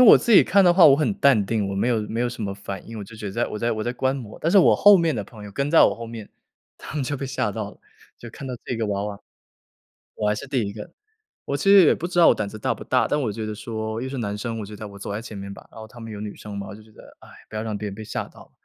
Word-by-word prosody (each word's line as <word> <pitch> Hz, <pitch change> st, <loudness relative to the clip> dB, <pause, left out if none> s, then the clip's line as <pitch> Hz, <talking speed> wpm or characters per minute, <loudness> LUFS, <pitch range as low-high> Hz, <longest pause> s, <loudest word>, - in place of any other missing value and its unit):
我 250 Hz, -, +10 dB
自 235 Hz, -, 0 dB
己 205 Hz, -, +9 dB
看 195 Hz, -1 st, +4 dB
的 175 Hz, -, +6 dB
话 175 Hz, -1 st, +7 dB
我 140 Hz, -, +7 dB
很 155 Hz, +7 st, +1 dB
淡 140 Hz, -, +4 dB
定， 105 Hz, -1 st, -1 dB
我 100 Hz, -, -3 dB
没 100 Hz, +5 st, 0 dB
有 115 Hz, -3 st, +1 dB
没 110 Hz, +2 st, -4 dB
有 120 Hz, -, +1 dB
什 120 Hz, -2 st, -7 dB
么 100 Hz, -1 st, -3 dB
反 100 Hz, -1 st, -7 dB
应， 115 Hz, -1 st, -7 dB
我 100 Hz, -, -6 dB
就 110 Hz, +3 st, -13 dB
觉 105 Hz, -1 st, -7 dB
得 95 Hz, -, -5 dB
在 115 Hz, +3 st, 0 dB
我 105 Hz, -, -6 dB
在 115 Hz, +2 st, 0 dB
我 110 Hz, -1 st, -3 dB
在 120 Hz, -, -1 dB
观 130 Hz, +2 st, 0 dB
摩。 115 Hz, -6 st, -9 dB
但 165 Hz, -, 0 dB
是 200 Hz, -, +6 dB
我 185 Hz, -, +6 dB
后 205 Hz, 0 st, +8 dB
面 165 Hz, -4 st, +1 dB
的 105 Hz, -, -2 dB
朋 105 Hz, +1 st, -12 dB
友， 105 Hz, -, -9 dB
跟 140 Hz, +6 st, -2 dB
在 165 Hz, -, +6 dB
我 -, -, +4 dB
后 115 Hz, 0 st, -8 dB
面， 115 Hz, -2 st, -9 dB, 0.5 s
他 -, -, -9 dB
们 150 Hz, -, -1 dB
就 145 Hz, +3 st, -2 dB
被 135 Hz, 0 st, -5 dB
吓 130 Hz, -5 st, -1 dB
到 100 Hz, 0 st, -5 dB
了， -, -, -19 dB, 0.4 s
就 120 Hz, -, -10 dB
看 135 Hz, -, -9 dB
到 125 Hz, -, -4 dB
这 125 Hz, -, -3 dB
个 115 Hz, -1 st, -1 dB
娃 100 Hz, -1 st, -2 dB
娃 105 Hz, -1 st, -6 dB, 1.0 s
我 105 Hz, -, -1 dB
还 105 Hz, -, +1 dB
是 140 Hz, -, -7 dB
第 130 Hz, -2 st, 0 dB
1 100 Hz, -, -5 dB
个， 105 Hz, 0 st, -9 dB, 0.5 s
我 140 Hz, -, -2 dB
其 -, -, -5 dB
实 195 Hz, -3 st, +8 dB
也 -, -, +5 dB
不 175 Hz, -, -4 dB
知 175 Hz, -1 st, -1 dB
道 170 Hz, -, +7 dB
我 -, -, +6 dB
胆 105 Hz, -, -2 dB
子 110 Hz, +1 st, -9 dB
大 -, -, 0 dB
不 -, -, -10 dB
大， -, -, +2 dB
但 150 Hz, -, 0 dB
我 110 Hz, -5 st, -1 dB
觉 110 Hz, +1 st, -5 dB
得 110 Hz, 0 st, -5 dB
说 110 Hz, 0 st, -4 dB
又 130 Hz, -, -3 dB
是 135 Hz, -, -5 dB
男 105 Hz, -2 st, -3 dB
生， 115 Hz, 0 st, -4 dB
我 105 Hz, -, -5 dB
觉 105 Hz, -, -10 dB
得 105 Hz, 0 st, -8 dB
我 100 Hz, 0 st, -12 dB
走 100 Hz, -, -6 dB
在 105 Hz, +2 st, -3 dB
前 110 Hz, -3 st, -9 dB
面 100 Hz, 0 st, -7 dB
吧， -, -, -14 dB
然 -, -, -12 dB
后 110 Hz, -, -9 dB
他 120 Hz, +2 st, -14 dB
们 115 Hz, -1 st, -8 dB
有 105 Hz, -, -7 dB
女 105 Hz, -1 st, -6 dB
生 105 Hz, -1 st, -8 dB
嘛， 100 Hz, 0 st, -5 dB
我 -, -, -8 dB
就 110 Hz, -, -14 dB
觉 110 Hz, -, -21 dB
得： -, -, -16 dB, 0.2 s
“哎， -, -, -15 dB, 0.2 s
不 110 Hz, -, -10 dB
要 110 Hz, -, -2 dB
让 110 Hz, -2 st, -3 dB
别 105 Hz, 0 st, -5 dB
人 100 Hz, -, -6 dB
被 110 Hz, -, -8 dB
吓 -, -, -4 dB
到 -, -, -16 dB
了。” -, -, -30 dB
110 Hz, 370 characters per minute, -23 LUFS, 105-135 Hz, 1.0 s, 我